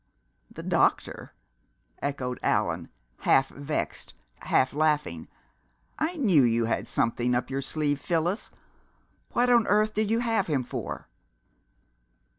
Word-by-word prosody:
"The - - -9
doctor!" - - +1 0.7
echoed 130 -3 -3
Allan, - - 0 0.3
half 135 0 +3
vexed, 145 +2 -4 0.2
half 130 - +1
laughing. 150 - 0 0.7
"I 330 +3 0
knew 195 - +4
you 115 -2 +2
had 115 - -1
something 120 +1 0
up 125 +2 -2
your 135 +1 -1
sleeve, 145 +1 -1
Phyllis! 175 +5 -1 0.8
What 245 +1 +3
on 235 -2 +5
earth 215 +2 +3
did 215 0 0
you 230 +1 +2
have 225 -4 +1
him 140 -5 0
for?" - - -6
150 Hz, 120 wpm, -27 LUFS, 130-215 Hz, 0.8 s, on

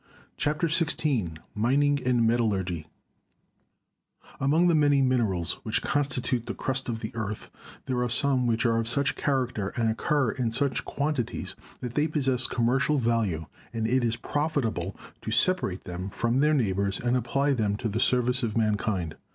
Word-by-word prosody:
CHAPTER 150 +3 0
XVI 150 - 0 0.2
MINING 140 +6 +2
AND 120 -2 +3
METALLURGY 95 -8 0 1.5
Among 155 +6 +3
the 170 - +4
many 145 -2 +4
minerals 115 -10 +1
which 110 - -1
constitute 135 -4 0
the - - -4
crust 135 -1 -2
of 115 -1 -3
the 110 - -4
earth 110 -2 -5 0.3
there 125 -2 -1
are 125 - 0
some 130 0 +3
which 115 +1 +1
are 115 -1 +3
of 115 - -2
such 140 +4 0
character 125 -8 -1
and 115 -2 +2
occur 135 +2 +1
in 120 -3 -2
such 135 +3 -1
quantities 140 -4 -3 0.3
that 125 -2 -5
they 150 +3 +2
possess 130 -5 +2
commercial 135 +5 +1
value, 115 - 0 0.3
and 115 -1 -2
it 130 +2 +2
is 115 -1 +1
profitable 115 - -2 0.2
to - - -5
separate 180 - +2
them 90 +2 -5
from 120 +5 0
their 150 +2 +4
neighbors 100 -5 0
and 120 +1 0
apply 135 +4 +1
them 105 -5 0
to 115 - -2
the 110 +1 -2
service 125 +1 +2
of 115 -2 -2
mankind. 105 -6 0
120 Hz, 160 wpm, -27 LUFS, 110-140 Hz, 1.5 s, the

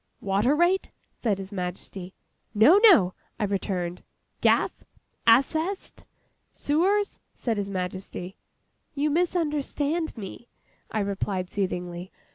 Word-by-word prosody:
'Water 200 +8 +2
rate?' 350 +4 +2 0.3
said 215 -5 +1
His 195 0 -7
Majesty. 180 0 -6 0.4
'No, 290 - +7
no,' 205 - +7 0.3
I - - 0
returned. 185 -3 -2 0.4
'Gas? - - +2 0.4
Assessed? 315 - +2 0.5
Sewers?' 390 +8 +1 0.2
said 230 -3 -2
His 200 -1 -2
Majesty. 185 0 -5 0.6
'You 290 +1 +1
misunderstand 315 -2 0
me,' 215 +3 -8 0.4
I 215 - -1
replied, 195 -2 -2
soothingly. 180 -2 -3
210 Hz, 100 wpm, -26 LUFS, 190-300 Hz, 0.6 s, No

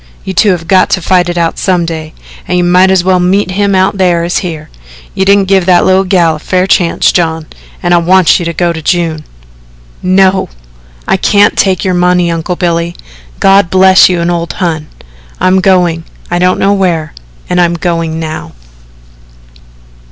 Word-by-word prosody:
You 190 - -5
two 205 +3 +2
have 170 -3 -2
got 185 -1 +3
to - - 0
fight 180 0 0
it 175 - -4
out 165 -1 -1
some 180 -3 0
day, 160 -1 -7 0.3
and 180 - -1
you 180 - +1
mought 180 +2 +3
as 190 -2 +2
well 185 0 +1
meet 185 +2 0
him 200 +1 0
out 190 +1 0
thar 175 -2 +1
as 175 +1 -1
here. 160 -4 -7 0.4
You 190 - -1
didn't 200 0 +3
give 190 -2 +1
that 180 -1 +3
little 190 +1 +2
gal 170 -4 +1
a - - -14
fair 185 +4 -1
chance, 180 -3 +1
John, 160 -2 -1 0.4
an' 175 0 +1
I - - +5
want 185 +2 +3
you 175 - -4
to 170 - -2
go 170 +1 -1
to 160 - -7
June." 165 -2 -2 0.8
"No, 190 +1 +1 0.6
I - - +1
can't 205 +2 +2
take 190 0 0
your 185 - 0
money, 180 -1 +1
Uncle 165 +2 -3
Billy 170 -1 -2 0.4
God 195 -2 +3
bless 190 +1 +5
you 180 -1 -1
and 170 +1 -1
old 170 -1 -3
Hon 160 -4 -3 0.5
I'm 185 +1 +2
going 180 -4 +1 0.3
I 175 - 0
don't 180 +1 +1
know 200 - +1
where 170 -6 -1 0.3
and 180 0 0
I'm 170 0 +1
going 165 -2 -3
now." 155 - -6
180 Hz, 190 wpm, -9 LUFS, 170-190 Hz, 0.8 s, I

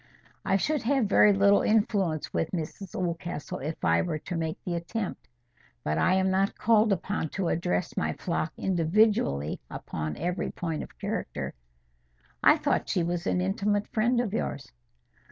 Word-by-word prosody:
"I 195 - +2
should 300 +9 0
have 265 0 +2
very 205 +1 +6
little 200 0 +5
influence 200 -7 +1
with 165 - 0
Mrs 175 +2 -5
Oldcastle 170 -3 -3
if 155 +4 -4
I - - +4
were 165 -3 -2
to 175 +4 -6
make 160 -1 -2
the 180 - -3
attempt. 170 +5 -4 0.6
But 75 - 0
I 185 - +3
am 190 0 +2
not 195 +1 +1
called 220 -1 +4
upon 195 -3 -1
to 190 -3 -1
address 180 +6 -1
my 190 - 0
flock 165 -2 -2
individually 170 - +2
upon 75 -1 -5
every 175 +1 -2
point 165 -3 -3
of - - -10
character." - - -4 0.9
"I - - +7
thought - - 0
she 175 - +1
was 175 +1 -2
an 180 - +1
intimate 205 +2 0
friend 240 +3 +2
of 230 -5 -1
yours." 220 - -3
185 Hz, 160 wpm, -28 LUFS, 165-205 Hz, 0.9 s, I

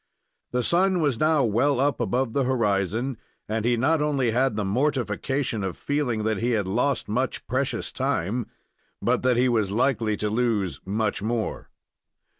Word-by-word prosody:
The 125 0 -1
sun 185 +4 +2
was 145 -7 +1
now 155 -2 +3
well 125 +5 +2
up 140 +1 +1
above 125 -2 0
the 140 - +2
horizon, 115 0 0 0.3
and 110 0 -1
he 120 0 +2
not 150 +6 +2
only 140 -5 +1
had 125 0 +1
the 105 -1 -1
mortification 125 0 -1
of 95 -3 -3
feeling 140 -7 -1
that 110 -2 0
he 120 +1 0
had 100 -3 -2
lost 125 +8 0
much 125 +4 -2
precious - - -2
time, 105 +7 -1 0.5
but - - +1
that 125 -1 +2
he 125 +1 +4
was 110 -5 +1
likely 110 -1 +1
to 105 - -1
lose 105 - 0
much 105 +1 -1
more. 110 +1 -3
120 Hz, 165 wpm, -25 LUFS, 105-135 Hz, 0.5 s, he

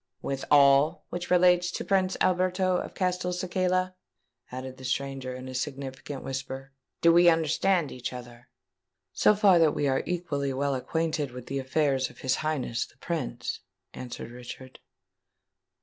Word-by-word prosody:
"With 135 -1 -3
all 145 +3 +5
which 175 0 -5
relates 180 -1 +4
to - - -4
Prince 190 -1 +1
Alberto 185 0 +2
of - - -5
Castelcicala?" 185 0 0 0.6
added 130 +1 -7
the 130 - -12
stranger, 130 0 -3
in 130 0 -8
a 130 - -7
significant 135 +1 -5
whisper. 135 0 -5 0.3
"Do 170 0 +6
we 175 0 +7
understand 160 +1 +2
each 125 -1 -5
other?" 120 -1 -10 0.6
"So 210 - +4
far 200 -4 +5
that 160 -2 +4
we 145 - 0
are 135 -1 +1
equally 150 -6 -2
well 140 +1 0
acquainted 155 +2 -1
with 125 0 -9
the 135 +1 -3
affairs 135 -1 +1
of - - -16
his 130 -1 +1
Highness 145 -7 -2
the - - -25
Prince," - - -4 0.3
answered 120 -2 -7
Richard. 125 +1 -10
145 Hz, 150 wpm, -27 LUFS, 130-180 Hz, 0.6 s, we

